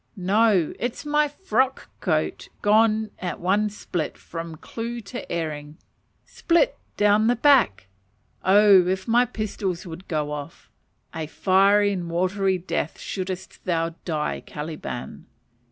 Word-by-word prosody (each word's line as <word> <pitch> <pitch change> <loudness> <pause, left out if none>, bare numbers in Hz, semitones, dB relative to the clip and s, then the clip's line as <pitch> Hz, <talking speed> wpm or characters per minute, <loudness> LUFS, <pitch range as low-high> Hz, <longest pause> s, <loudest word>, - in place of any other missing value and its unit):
No, 195 -2 +3
it 240 0 -1
is - - -10
my 300 0 +2
frock 265 - -1
coat - - -1
gone 215 0 +3
at 180 -1 -4
one 205 +4 +1
split 175 -6 -4
"from 165 -1 -7
clue 235 +8 -6
to 240 +4 -8
earing" 155 -2 -4 0.5
split 360 +9 +1 0.2
down 210 +1 +4
the 245 - +3
back. 245 - +4 0.6
Oh, 195 -2 +6
if 190 +3 -1
my 240 +2 +4
pistols 200 -5 -4
would 175 +2 -9
go 150 -2 -2
off, 145 -1 -8 0.4
a 160 -1 -4
fiery 200 +4 +3
and 175 -3 -4
watery 185 +2 +1
death 170 -3 -3
shouldst 185 -1 -5
thou 165 -2 0
die, 155 -3 -2
Caliban. 150 -5 -7
190 Hz, 130 wpm, -24 LUFS, 170-220 Hz, 0.6 s, Oh